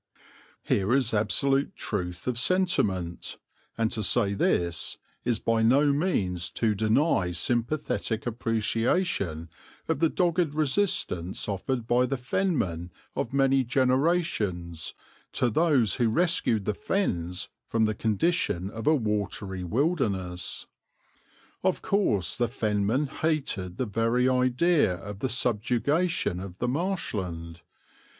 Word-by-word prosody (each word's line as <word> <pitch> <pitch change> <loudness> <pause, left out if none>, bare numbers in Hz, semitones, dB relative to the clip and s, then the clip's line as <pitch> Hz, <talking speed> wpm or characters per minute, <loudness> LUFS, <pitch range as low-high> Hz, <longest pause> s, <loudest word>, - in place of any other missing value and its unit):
'" - - -28
Here 100 +6 +2
is 130 -5 +2
absolute 135 +6 +1
truth 90 -4 -4
of 125 -2 0
sentiment, 110 - 0 0.4
and 115 -1 +1
to 110 - -2
say 105 -1 +2
this 85 -4 0 0.3
is 120 -2 +1
by 115 +1 +1
no 140 +6 +4
means 95 - 0
to 110 -2 +1
deny 110 - +2
sympathetic 115 - -1
appreciation 115 - 0 0.4
of - - 0
the 165 0 +3
dogged 170 -4 +1
resistance 135 - 0
offered 110 +5 -2
by 125 +2 +3
the 135 +1 -1
Fenmen 125 - -1 0.3
of 115 - -2
many 135 0 +3
generations 125 - 0 0.4
to 125 -2 +1
those 135 - +3
who 120 -2 +2
rescued 115 - +1
the 105 - 0
Fens 90 - -2 0.2
from 115 -1 +2
the 110 - 0
condition 105 - 0
of 115 0 -6
a 155 - +6
watery 105 -5 -2
wilderness. 100 - -1 1.0
Of 185 -1 +1
course 105 - +2
the 120 - +1
Fenmen 110 +3 0
hated 135 - -2
the 130 - 0
very 115 +3 +1
idea 130 - +3
of 100 +3 -8
the 130 - -1
subjugation 125 - +1
of 95 -1 -8
the 125 - -1
Marshland. 95 - -3
115 Hz, 120 wpm, -27 LUFS, 100-140 Hz, 1.0 s, a